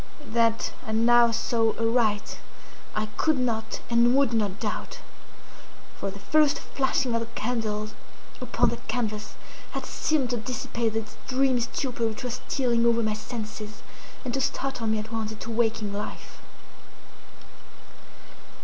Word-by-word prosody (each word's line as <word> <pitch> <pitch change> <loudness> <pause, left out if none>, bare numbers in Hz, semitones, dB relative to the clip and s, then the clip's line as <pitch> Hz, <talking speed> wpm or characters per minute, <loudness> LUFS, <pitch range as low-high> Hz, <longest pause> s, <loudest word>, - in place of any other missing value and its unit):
That 230 -1 +2
I 220 - -2
now 235 +1 +6
saw 225 0 +1
aright 225 -2 +1 0.6
I 215 0 +1
could 315 -2 +3
not 225 -3 -1
and 235 +1 +4
would 275 -4 +4
not 205 -4 0
doubt; - - -3 1.0
for - - -3
the 195 - -8
first 295 +8 +3
flashing 265 -2 0
of 230 - +2
the 230 - -4
candles 215 -2 -1 0.5
upon - - +2
that - - -6
canvas 215 -4 -2 0.4
had - - -3
seemed 280 -6 +1
to 245 - +1
dissipate 235 -1 -2
the 225 0 0 0.2
dreamy 260 -1 +3
stupor 235 0 -1
which 220 +1 -5
was 250 +1 -3
stealing 240 -3 +2
over 235 0 +4
my 215 -1 +1
senses, 215 -1 -6 0.4
and 245 - -2
to 270 - 0
startle 270 -3 -1
me 220 0 +2
at 215 +1 -5
once 220 -1 -2
into 220 +1 -6
waking 225 -2 +1
life. 205 +1 -6
230 Hz, 140 wpm, -27 LUFS, 220-250 Hz, 1.0 s, now